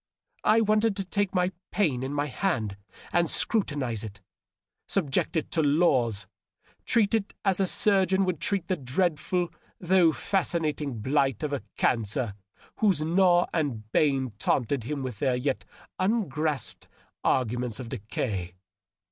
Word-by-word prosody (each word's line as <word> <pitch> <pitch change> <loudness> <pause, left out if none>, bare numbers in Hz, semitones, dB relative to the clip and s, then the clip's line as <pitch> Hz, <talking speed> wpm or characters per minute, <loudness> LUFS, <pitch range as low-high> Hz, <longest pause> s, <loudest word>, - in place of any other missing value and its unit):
I 225 +1 +5
wanted 215 0 +2
to 195 - -2
take 200 0 -1
my 180 0 +2 0.2
pain 160 -11 +1
in 130 +1 -3
my 145 0 0
hand 130 - -1 0.4
and 170 -2 +3
scrutinize 140 - 0
it, 105 -2 -8 0.7
subject 165 -2 0
it 160 - -2
to 165 - +2
laws, 135 - +2 0.6
treat 220 -3 +2
it 215 -3 0
as 195 -2 +3
a 190 - +2
surgeon 190 -1 +3
would 180 -5 -1
treat 195 -4 0
the 185 - +1
dreadful 175 +5 0 0.3
though 175 -2 +4
fascinating 155 - -1
blight 135 0 +1
of 145 -1 -1
a 140 - -1 0.2
cancer 115 -1 0 0.4
whose 195 -8 +2
gnaw 175 +1 +4
and 120 -10 -2
bane 135 -3 +2
taunted 125 0 0
him 145 0 -3
with 125 -6 -5
their 130 -3 +2
yet 130 +2 -2 0.3
ungrasped 160 - -1 0.4
ar 130 - +3
guments 120 0 -4
of 125 -3 -6
decay. 100 -4 -4
150 Hz, 140 wpm, -27 LUFS, 125-185 Hz, 0.7 s, I